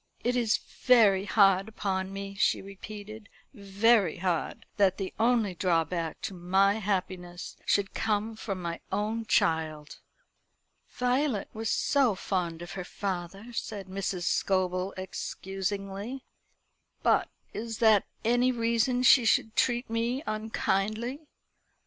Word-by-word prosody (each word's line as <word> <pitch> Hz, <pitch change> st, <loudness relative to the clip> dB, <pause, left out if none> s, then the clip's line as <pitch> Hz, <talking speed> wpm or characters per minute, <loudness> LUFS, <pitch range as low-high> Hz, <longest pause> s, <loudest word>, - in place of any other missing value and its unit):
"It 245 Hz, +1 st, +1 dB
is 235 Hz, -3 st, +2 dB
very 210 Hz, -6 st, +3 dB
hard 195 Hz, -1 st, +4 dB
upon 190 Hz, -3 st, -2 dB
me," 195 Hz, 0 st, -6 dB
she 195 Hz, -, +2 dB
repeated 210 Hz, +2 st, -10 dB, 0.2 s
"very 200 Hz, -, +2 dB
hard 175 Hz, -3 st, -2 dB
that 195 Hz, -2 st, +3 dB
the 195 Hz, -2 st, -4 dB
only 225 Hz, -4 st, +2 dB
drawback 170 Hz, -2 st, 0 dB
to -, -, -4 dB
my 190 Hz, +4 st, +2 dB
happiness 185 Hz, -3 st, -3 dB
should 200 Hz, -1 st, +1 dB
come 215 Hz, +1 st, -1 dB
from 195 Hz, -4 st, -5 dB
my 170 Hz, 0 st, -3 dB
own 215 Hz, +3 st, -2 dB
child." 155 Hz, -2 st, 0 dB, 0.9 s
"Violet 250 Hz, -2 st, 0 dB
was 220 Hz, 0 st, -3 dB
so 265 Hz, -7 st, +2 dB
fond 175 Hz, -3 st, -2 dB
of 175 Hz, -, -9 dB
her 190 Hz, -, -5 dB
father," 195 Hz, +4 st, -5 dB
said 205 Hz, -3 st, -4 dB
Mrs. 190 Hz, -1 st, -3 dB
Scobel 185 Hz, 0 st, 0 dB
excusingly. 195 Hz, +5 st, -5 dB, 0.8 s
"But -, -, +3 dB, 0.2 s
is 225 Hz, 0 st, -5 dB
that 220 Hz, -3 st, +4 dB, 0.2 s
any 245 Hz, +2 st, +3 dB
reason 235 Hz, +1 st, +1 dB
she 250 Hz, 0 st, +7 dB
should 220 Hz, -1 st, +2 dB
treat 245 Hz, -1 st, +1 dB
me 235 Hz, +5 st, -1 dB
unkindly? 215 Hz, +5 st, -2 dB
200 Hz, 120 wpm, -28 LUFS, 190-225 Hz, 0.9 s, she